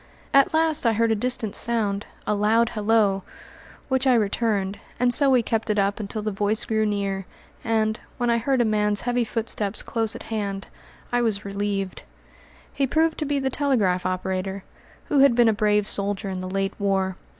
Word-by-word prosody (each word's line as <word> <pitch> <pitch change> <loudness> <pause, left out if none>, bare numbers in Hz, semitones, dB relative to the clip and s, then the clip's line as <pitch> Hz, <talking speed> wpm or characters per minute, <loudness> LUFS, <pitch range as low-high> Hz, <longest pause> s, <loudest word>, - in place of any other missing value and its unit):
At 275 0 +5
last 315 -4 +2
I 230 - +3
heard 230 +1 +2
a - - +3
distant 225 -2 -1
sound, 210 -4 -1 0.2
a - - +1
loud 220 +3 +2
halloo, 210 -2 +2 0.7
which 265 0 +1
I 255 - +5
returned, 205 -2 0 0.2
and 245 0 +3
so 280 +1 +4
we 255 -3 +4
kept 225 0 -2
it 210 - +1
up 200 +1 +1
until 210 +1 -4
the 215 - -1
voice 205 +3 0
grew 220 -2 +1
near, 195 -2 -2 0.4
and, 220 -1 0 0.2
when 245 - -1
I 235 - +2
heard 260 +2 +1
a - - +2
man's 210 -1 +1
heavy 245 0 0
footsteps 220 -2 -2
close 225 -2 -1
at - - -8
hand, 200 -2 -3 0.5
I 245 0 +2
was 215 -3 0
relieved. 200 -1 -3 0.7
He 275 - 0
proved 320 +4 +1
to 305 - -1
be 290 0 0
the 265 -1 -1
telegraph 225 -11 +1
operator, 185 +1 -3 0.4
who 290 - +1
had 270 -3 +6
been 240 -1 +5
a - - +3
brave 210 0 +2
soldier 200 0 -1
in 185 -1 -4
the 185 - -5
late 195 0 -1
war. 190 -2 0
215 Hz, 190 wpm, -24 LUFS, 200-240 Hz, 0.7 s, had